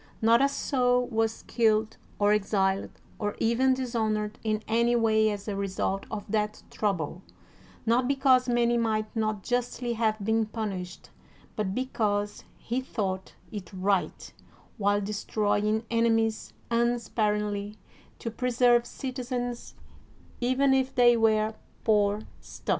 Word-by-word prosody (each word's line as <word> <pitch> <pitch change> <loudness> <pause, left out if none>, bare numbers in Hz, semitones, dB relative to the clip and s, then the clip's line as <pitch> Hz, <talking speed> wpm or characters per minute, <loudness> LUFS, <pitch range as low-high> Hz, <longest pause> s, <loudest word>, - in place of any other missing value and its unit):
Not 230 +2 +5
a 275 - +4
soul 250 -3 +1
was 225 -1 -1
killed 220 -2 +1 0.2
or 205 0 +4
exiled 195 -2 +1 0.3
or 205 -1 -2
even 255 +3 +2
dishonored 220 -4 -2
in 215 -1 -1
any 235 +2 +2
way 220 -2 +3
as 205 -1 -5
a 205 - -2
result 195 0 -2
of 210 -2 -5
that 210 0 -1
trouble, 180 -5 -2 0.6
not 240 +2 +2
because 265 -2 +3
many 240 0 +2
might 215 -1 -1
not 215 -3 -1
justly 245 0 -1
have 220 -1 +1
been 220 0 +2
pimished, 195 -5 -5 0.4
but 205 -3 -2
beciause 210 -5 -1 0.2
he 245 +3 -2
thought 190 -7 -4 0.2
it 200 -5 -7
right 190 0 -1 0.5
while 205 0 +2
destroying 210 +1 0
enemies 225 -1 +1 0.2
un 235 +1 +2
sparingly, 210 -2 -1 0.4
to 230 - -5
preserve 240 0 +3
citizens, 245 -2 -4 0.6
even 260 +3 +3
if 265 0 +1
they 240 -1 +6
were 220 -1 +2 0.3
poor 210 -1 +2 0.2
stuff. - - -13
220 Hz, 125 wpm, -28 LUFS, 210-240 Hz, 0.6 s, they